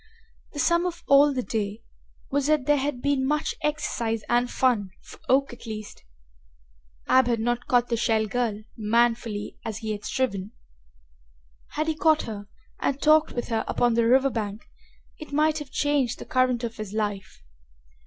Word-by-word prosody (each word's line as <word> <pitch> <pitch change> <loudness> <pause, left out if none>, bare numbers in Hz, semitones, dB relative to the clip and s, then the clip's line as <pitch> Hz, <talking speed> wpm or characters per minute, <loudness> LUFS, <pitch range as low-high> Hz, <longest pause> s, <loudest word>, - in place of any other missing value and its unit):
The - - -9
sum 340 +6 +2
of 345 -1 -6
all 280 +1 +6
the 255 -2 -2
day 215 0 -3 0.5
was 280 0 +1
that 305 -4 +2
there 295 +1 +4
had 265 -2 -3
been 285 -2 +1
much 300 +3 0
exercise 240 -7 -1
and 245 +1 +2
fun, 240 -8 +1
for - - -13
Oak 270 0 +3
at 240 - -12
least. 215 -1 -7 1.0
Ab 260 -1 +5
had 235 -2 +1
not 240 +2 -1
caught 245 -1 +2
the 235 - 0
Shell 220 -1 +2
girl, 215 -1 -2
manfully 230 -1 0
as 220 -2 -4
he 220 -1 -4
had 210 0 -5
striven. 215 -5 -2 1.2
Had 305 - -1
he 320 - +1
caught 310 0 +3
her 205 -2 -7 0.3
and 275 - -1
talked 310 +1 +4
with 240 - -4
her 225 -1 0
upon 240 -1 +2
the 230 0 +2
river 265 +3 +4
bank 210 -2 -4 0.5
it 310 - -9
might 305 +2 +2
have 295 -2 -8
changed 280 -3 0
the - - -9
current 255 -1 +1
of 230 -1 -4
his 215 -2 -6
life. 205 - -3
245 Hz, 175 wpm, -25 LUFS, 220-285 Hz, 1.2 s, all